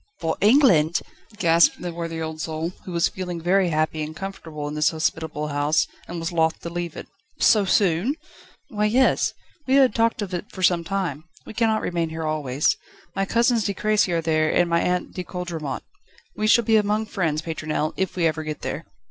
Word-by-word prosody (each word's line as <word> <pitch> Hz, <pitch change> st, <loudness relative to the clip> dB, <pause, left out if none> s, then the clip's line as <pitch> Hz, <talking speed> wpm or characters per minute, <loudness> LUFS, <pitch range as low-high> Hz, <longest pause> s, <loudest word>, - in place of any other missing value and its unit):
"For 160 Hz, -1 st, -1 dB
England?" 200 Hz, -, +5 dB, 0.4 s
gasped 170 Hz, -4 st, +4 dB
the 175 Hz, -1 st, -5 dB
worthy 165 Hz, -1 st, -4 dB
old 160 Hz, -1 st, -4 dB
soul, 160 Hz, +1 st, -3 dB
who 185 Hz, -, -6 dB
was 170 Hz, -1 st, +2 dB
feeling 180 Hz, -2 st, -5 dB
very 180 Hz, +2 st, +2 dB
happy 155 Hz, 0 st, 0 dB
and 155 Hz, +1 st, -5 dB
comfortable 160 Hz, -5 st, -6 dB
in 145 Hz, -, -5 dB
this 150 Hz, 0 st, +3 dB
hospitable 160 Hz, -1 st, -2 dB
house, 145 Hz, +2 st, +2 dB, 0.2 s
and 175 Hz, -, -6 dB
was 165 Hz, +2 st, -3 dB
loth 160 Hz, -1 st, +1 dB
to 170 Hz, -, -6 dB
leave 175 Hz, -1 st, -4 dB
it. -, -, -8 dB, 0.3 s
"So 210 Hz, -3 st, +5 dB
soon?" 190 Hz, -, +2 dB, 0.5 s
"Why, 210 Hz, 0 st, 0 dB
yes; 250 Hz, +5 st, +2 dB, 0.3 s
we 265 Hz, -, +3 dB
had 265 Hz, -5 st, +5 dB
talked 230 Hz, -1 st, +1 dB
of 190 Hz, -2 st, -7 dB
it 180 Hz, +3 st, -5 dB
for 185 Hz, -, -6 dB
some 175 Hz, -1 st, +3 dB
time. 170 Hz, -5 st, -3 dB, 0.2 s
We -, -, -9 dB
cannot 220 Hz, -1 st, +1 dB
remain 170 Hz, -2 st, -1 dB
here 160 Hz, 0 st, -4 dB
always. 150 Hz, -3 st, +1 dB, 0.4 s
My 195 Hz, -, 0 dB
cousins 235 Hz, 0 st, +2 dB
De 200 Hz, -, -1 dB
Crécy 215 Hz, -3 st, +2 dB
are 170 Hz, -1 st, +1 dB
there, 155 Hz, -1 st, +1 dB
and 175 Hz, -, +3 dB
my 170 Hz, 0 st, +2 dB
aunt 180 Hz, 0 st, -1 dB
De 180 Hz, -, -4 dB
Coudremont. 175 Hz, -5 st, -5 dB, 0.5 s
We 215 Hz, -, 0 dB
shall 235 Hz, +2 st, +5 dB
be 225 Hz, 0 st, +4 dB
among 210 Hz, +1 st, +1 dB
friends, 165 Hz, -7 st, -1 dB
Pétronelle, 155 Hz, -1 st, -2 dB
if 190 Hz, -, -2 dB
we 175 Hz, -2 st, +1 dB
ever 155 Hz, -1 st, +1 dB
get 155 Hz, -1 st, -5 dB
there." -, -, -4 dB
170 Hz, 200 wpm, -23 LUFS, 160-200 Hz, 0.5 s, England